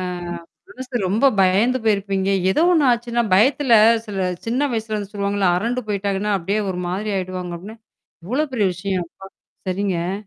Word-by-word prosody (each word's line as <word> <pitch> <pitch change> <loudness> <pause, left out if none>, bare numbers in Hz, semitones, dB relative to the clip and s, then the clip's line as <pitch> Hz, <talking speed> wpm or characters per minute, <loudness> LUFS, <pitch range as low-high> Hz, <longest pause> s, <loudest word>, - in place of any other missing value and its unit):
ஆ. - - -3 0.7
மனசு 255 -1 -6
ரொம்ப 220 +8 +2
பயந்து 205 +8 +3
போயிருப்பீங்க. 195 -2 0 0.2
ஏதோ 190 - +1
ஒண்ணு 315 -5 +3
ஆச்சுன்னா, 235 0 0
பயத்துல 260 +5 +3 0.3
சில 200 -2 -4 0.3
சின்ன 265 +5 0
வயசுல 220 -1 -2
அது 205 +1 -9
சொல்லுவாங்கல்ல, 200 -1 0
அரண்டு 240 +6 -1
போய்ட்டாங்கன்னா 200 0 -1
அப்படியே 195 +5 -1
ஒரு 180 -1 -4
மாதிரி 200 +4 -3
ஆயிடுவாங்க 185 -1 -4
அப்படின்னு, 210 +6 -11 0.5
எவ்ளோ 295 +6 0
பெரிய 205 -5 +2
விஷயம்! 185 -1 -3
அப்பா! 195 - -12 0.4
சரிங்க. 185 -2 -1
205 Hz, 150 wpm, -21 LUFS, 190-235 Hz, 0.7 s, பயந்து